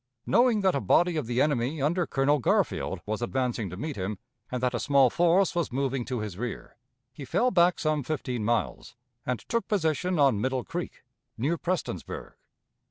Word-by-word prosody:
Knowing 235 -3 +3
that 190 -1 +3
a 140 - 0
body 175 -1 +3
of 150 -7 -2
the 120 +1 -1
enemy 145 +1 +1
under 165 +4 +1
Colonel 140 +2 +2
Garfield 120 - 0
was 110 +2 -3
advancing 120 -4 -1
to 90 - -8
meet 150 +5 -4
him, 100 +2 -3 0.3
and 125 - -1
that 125 0 +1
a 120 - -1
small 140 -4 +4
force 175 +2 +3
was 170 -5 -1
moving 135 -1 -1
to 125 -4 -3
his 105 -3 -6
rear, 120 -1 -5 0.4
he 150 - -9
fell 245 - +1
back 175 -2 +4
some 155 -1 0
fifteen 125 -5 -3
miles, 115 0 -1 0.3
and 125 -2 -1
took 230 0 -1
position 180 - 0
on 135 -8 +3
Middle 130 0 -1
Creek, - - -6 0.3
near 145 +9 0
Prestonsburg. 170 - -4
140 Hz, 180 wpm, -27 LUFS, 120-170 Hz, 0.4 s, small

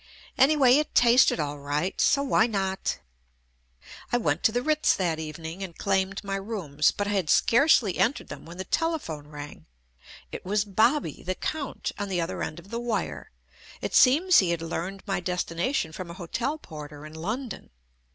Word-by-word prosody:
Anyway, 270 -2 +5
it 300 0 -2
tasted 240 -5 +5
all 145 -1 -3
right, 145 +6 -2
so 280 - +3
why 260 -4 +3
not? 195 -3 -2 1.1
I 245 - +3
went 160 -8 0
to - - +5
the 245 +2 -1
Ritz 305 0 +2
that 170 -4 -1
evening 160 +3 -6
and 185 -4 -7
claimed 195 0 0
my 195 -1 -2
rooms, 185 -8 0
but 205 - -2
I 205 - -2
had 190 -6 0
scarcely 235 - +4
entered 255 - +1
them - - -9
when 170 +2 -11
the 190 - -3
telephone 235 - -2
rang. 145 -1 -10 0.6
It - - -7
was 205 +2 0
"Bobby," 225 +9 +1
the 185 +1 -3
count, 295 +4 -4
on 205 -1 -3
the 185 -2 -1
other 165 - -3
end 155 - -4
of 180 +4 -13
the 235 - -2
wire. 230 -6 -3 0.5
It - - -4
seems 330 +9 +6
he 185 - +2
had 170 -1 -1
learned 185 +4 -4
my 195 -3 -1
destination 180 - -1
from 175 +1 -7
a 170 - -8
hotel 230 - -3
porter 150 - -10
in 155 - -10
London. 215 +9 -5
195 Hz, 180 wpm, -26 LUFS, 165-240 Hz, 1.1 s, seems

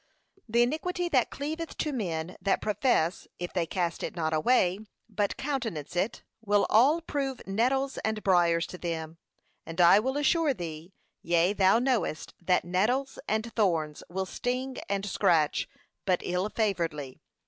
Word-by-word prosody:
The 235 +2 +4
iniquity 345 +7 -1
that 260 -7 +2
cleaveth 315 +4 -5
to 300 - -1
men 175 -7 -3
that 195 - +1
profess, 205 -5 +1
if 175 0 -5
they 175 -3 0
cast 175 -2 -2
it - - -4
not 160 -2 -1
away, 185 +2 +3 0.3
but 205 -2 -1
countenance 235 - -3
it, 190 +6 -1 0.2
will 205 -1 +3
a11 290 +9 +4
prove 275 -4 -2
nettles 260 +7 0
and 220 -1 -2
briars 175 -3 +3
to 180 - -9
them; 165 -1 -4 0.4
and 165 +2 -8
I 175 +3 +7
will 265 +5 -1
assure 295 -1 +2
thee, 165 -1 -7 0.3
yea, 170 +3 +2
thou 195 +1 +4
knowest, 235 - -1
that 180 0 +2
nettles 225 +10 0
and 220 +1 -1
thorns 165 -8 0
will 190 +2 -2
sting 255 +6 -3
and 200 0 -1
scratch 160 -6 +2 0.4
but 185 -2 +2
ill 180 +3 -1
favouredly. 165 - -2
200 Hz, 150 wpm, -28 LUFS, 175-255 Hz, 0.4 s, I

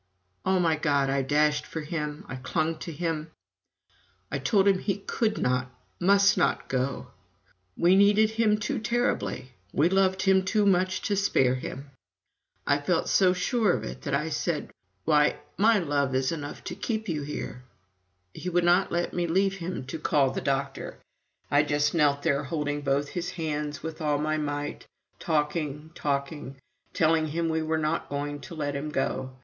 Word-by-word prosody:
O 190 0 +3
my 165 -3 +2
God 140 -3 +1
I 140 0 +1
dashed 150 +3 +1
for 160 - -5
him, 150 -1 -4
I 130 - -6
clung 155 +5 -1
to 170 - -6
him, 160 0 -3 1.0
I - - -1
told 200 -3 +3
him 195 -2 +4
he 195 -1 -1
could 215 +2 -1
not, 125 0 0 0.3
must 200 +2 +4
not - - +1
go 130 -1 -2 0.7
we 175 +2 +5
needed 205 +2 +5
him 220 -1 +2
too 240 +5 -2
terribly, 235 - -1 0.2
we 155 +4 +3
loved 190 0 +2
him 190 -1 +4
too 205 +2 +1
much 185 -1 +2
to 205 - 0
spare 135 -10 +3
him. 135 +2 -6 0.7
I 145 0 +2
felt 165 +3 0
so 185 -2 +5
sure 200 +2 +1
of - - -2
it, 65 +1 -7
that - - -1
I - - -1
said: - - -2 0.3
"Why, 150 -1 +4 0.2
my 220 +2 +4
love 145 -6 0
is 130 0 +1
enough 145 -3 -6
to - - -5
keep 220 -2 -3
you 155 -5 -2
here!" 140 -3 -5 0.7
He 180 - -5
would 175 0 +2
not 175 +2 +3
let 175 0 -1
me 175 -1 0
leave 195 +3 +1
him 175 -6 -5
to 145 +5 -6
call 140 -3 +2
the - - -3
doctor. 135 0 -2 0.5
I 145 - +5
just 145 0 +1
knelt 145 -3 +2
there 145 -2 +1
holding 145 0 -2
both 140 0 0
his 175 0 -3
hands 150 -3 -3
with 160 0 -6
all 150 -2 +1
my 155 +1 0
might, 145 -1 -4 0.3
talking, 150 -1 -1
talking, 140 -2 -3 0.4
telling 160 0 +2
him 165 +2 -1
we 160 0 0
were 160 0 0
not 155 +1 -1
going 145 +1 -3
to 170 - -9
let 145 -2 -2
him 145 +2 -3
go. 130 -2 -2
155 Hz, 175 wpm, -27 LUFS, 145-185 Hz, 1.0 s, we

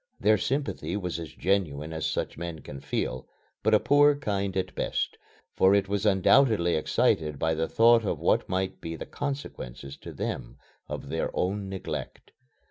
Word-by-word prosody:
Their 110 -1 +4
sympathy 125 - -2
was 90 -4 -3
as 80 - -7
genuine 80 -5 -1
as 80 -1 -2
such - - -2
men 85 -1 -6
can 70 - -8
feel, 65 -1 -3 0.3
but 110 +1 +4
a - - +5
poor 145 +5 +5
kind 100 -9 -2
at 95 - -2
best, - - -1 0.4
for 95 +1 +5
it 100 -1 +2
was 100 +1 0
undoubtedly 100 -2 +4
excited 75 -1 +1
by 80 +3 +1
the 80 +1 -1
thought 115 0 +5
of 100 - -1
what - - +1
might 95 0 -2
be 80 0 -5
the - - -6
consequences 70 - -6
to - - -9
them - - -5 0.3
of - - -5
their - - -1
own 100 +1 -1
neglect. 95 -1 -6
95 Hz, 170 wpm, -27 LUFS, 80-105 Hz, 0.4 s, a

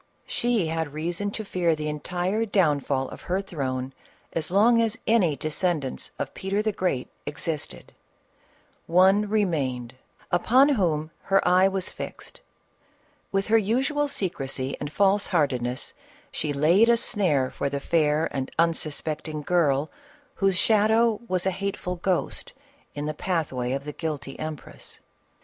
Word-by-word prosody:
She 235 -6 0
had 160 -2 -2
reason 175 +6 -2
to 215 +1 -5
fear 175 -4 +1
the 150 0 -4
entire 180 +7 -1
downfall 145 -10 +1
of - - -10
her 185 +2 +2
throne 135 -8 -3 0.4
as 160 -2 0
long 225 +5 +5
as 225 -1 +1
any 195 -10 +3
descendants 155 -1 -1
of - - -4
Peter 195 +2 -1
the 215 - +1
Great 180 -10 -1 0.2
existed: 150 +1 -4 0.9
one 190 +4 +4
remained 140 - 0 0.4
upon 250 +11 +5
whom 165 - +1
her 195 -1 +3
eye 185 +2 +6
was 190 -1 -2
fixed; - - -8 0.9
with 195 0 +1
her 225 +1 +6
usual 265 +8 +1
secrecy 135 - -2
and 145 - -4
false 200 +3 +3
heartedness 130 -8 0 0.4
she 150 - -2
laid 170 +11 +4
a 235 - +5
snare 170 - +1
for 140 - -2
the 140 0 -2
fair 155 0 +2
and 135 -1 -2
unsuspecting 155 -1 0
girl 150 -4 +2 0.4
whose 195 -2 +1
shadow 220 +2 +3
was 185 -3 0
a 190 - +2
hateful 185 -1 -3
ghost 180 +1 -1 0.4
in 145 0 -3
the 155 - -2
pathway 150 -8 -2
of 135 +1 -2
the 150 - -5
guilty 150 -4 -5
empress. 155 -2 -6
170 Hz, 140 wpm, -26 LUFS, 150-200 Hz, 0.9 s, eye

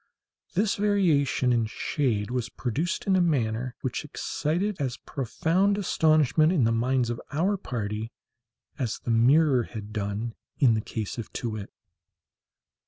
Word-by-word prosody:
This 200 +2 +2
variation 165 -11 +2
in 115 -2 +1
shade 115 -3 -1
was 125 -1 -2
produced 140 +10 -2
in 195 - +3
a 185 - +4
manner 125 -6 0
which 130 - -2
excited 180 +7 -2
as 130 -3 -2
profound 165 - 0
astonishment 155 -4 +3
in 165 -9 +2
the 115 - +3
minds 120 +1 +1
of 120 - -5
our 180 +8 +1
party 110 - -4 0.7
as 120 -5 -1
the 120 - -3
mirror 130 +4 +5
had 110 -2 -8
done 105 +2 -3 0.2
in 125 -5 +5
the 110 - 0
case 110 +1 -5
of 115 - -6
Too 120 - -3
wit. 105 -2 -6
130 Hz, 145 wpm, -27 LUFS, 115-160 Hz, 0.7 s, mirror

